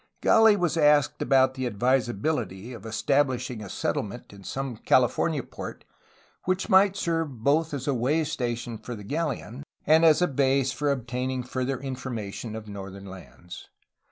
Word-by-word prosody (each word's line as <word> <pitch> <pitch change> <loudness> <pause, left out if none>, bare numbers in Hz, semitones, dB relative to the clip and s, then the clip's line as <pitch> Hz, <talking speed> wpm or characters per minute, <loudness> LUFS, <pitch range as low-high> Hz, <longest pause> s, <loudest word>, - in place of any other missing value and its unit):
Gah 225 -1 +6
was 175 -3 0
asked 150 -4 +3
about 130 -1 +4
the 130 -1 -2
advisabihty 120 -1 -1
of 115 - -12
estabhshing 125 0 0
a 100 - -8
settle - - -1
ment 110 +1 -9
in 100 -1 -13
some 135 +1 -4
California 130 +5 +2
port, - - -9 0.6
which 185 +1 -1
might 190 +1 +5
serve 165 - -2
both 155 +4 +2
as 140 -2 -5
a 140 - +2
way 135 +7 +1
station 120 -5 -3
for 120 +2 -7
the 105 - -9
galleon 140 -1 -3 0.2
and 160 +2 +5
as 160 -2 +6
a 180 - +3
base 135 -1 +2
for 145 +2 -1
obtaining 125 0 -2
further 130 +1 -2
information 120 -5 -5
of 110 -1 -8
northern 100 -1 -8
lands. 95 -2 -11
130 Hz, 155 wpm, -26 LUFS, 115-150 Hz, 0.6 s, Gah